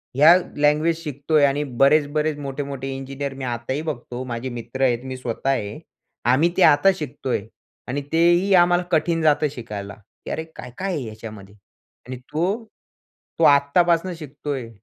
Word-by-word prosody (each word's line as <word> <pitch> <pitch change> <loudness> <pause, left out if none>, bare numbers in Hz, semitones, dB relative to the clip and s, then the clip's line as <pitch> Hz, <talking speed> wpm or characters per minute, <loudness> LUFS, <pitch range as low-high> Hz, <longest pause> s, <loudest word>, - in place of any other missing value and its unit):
ह्या 155 +5 +8 0.2
लँग्वेज 150 +3 +2
शिकतोय. 145 0 +1
आणि 140 +2 +1
बरेच-बरेच, 145 +3 +2
मोठे-मोठे 140 -1 -5
इंजिनिअर 135 +1 -5
मी 135 0 -8
आताही 120 +4 -3
बघतो. 125 -5 -5
माझे 125 +1 -4
मित्र 120 +2 -7
आहेत, 120 -1 +2
मी 130 -1 -6
स्वतः 125 +2 -3
आहे. 105 -6 -2 0.5
आम्ही 130 +8 +4
ते 190 - +5
आता 155 +5 +6
शिकतोय. 135 - -3 0.5
आणि 140 +3 -2
तेही 175 +4 +3
आम्हाला 175 0 +4
कठीण 165 +1 +1
जातं 150 -1 +3
शिकायला, 105 -6 -7 0.3
की, - - -5
"अरे, 160 - -3
काय-काय 185 +10 -5
आहे 145 -5 -3
ह्याच्यामध्ये?" 110 -3 -10 0.5
आणि 130 -1 -6
तो? 175 - -2 0.8
तो 165 - +2
आत्तापासून 170 +5 +4
शिकतोय. 145 -5 -6
140 Hz, 145 wpm, -22 LUFS, 125-160 Hz, 0.8 s, ह्या